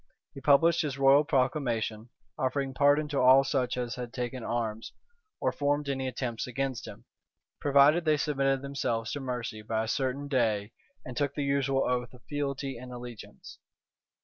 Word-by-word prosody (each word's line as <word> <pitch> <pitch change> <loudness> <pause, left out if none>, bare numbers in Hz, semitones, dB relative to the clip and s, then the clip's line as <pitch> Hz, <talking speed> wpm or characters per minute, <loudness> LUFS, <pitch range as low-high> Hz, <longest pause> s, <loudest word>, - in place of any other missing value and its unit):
He 135 - -9
published 160 +5 +4
his 145 -4 -3
royal 135 +2 +6
proclamation, 125 -6 -1 0.3
offering 135 +1 -1
pardon 145 +2 +3
to 145 - -1
all 130 +2 +7
such 125 -3 -1
as 120 -1 -2
had 125 -1 -5
taken 125 0 -4
arms, 115 -2 -3 0.5
or - - +1
formed 145 0 0
any 135 -1 -2
attempts 125 -3 -3
against 130 -2 -3
him, - - -11 0.5
provided 145 +4 +5
they 155 -2 +3
submitted 135 -2 0
themselves 115 -5 -2
to 145 - -3
mercy 120 -5 -4
by 110 +1 -1
a - - -5
certain 135 +3 -1
day, 110 -6 0 0.3
and 125 - -7
took 140 +1 -1
the 145 - -1
usual 140 -1 +1
oath 125 0 -2
of 125 - -18
fealty 140 -3 -3
and 125 +1 -9
allegiance. 120 -2 -10
135 Hz, 165 wpm, -29 LUFS, 120-140 Hz, 0.5 s, all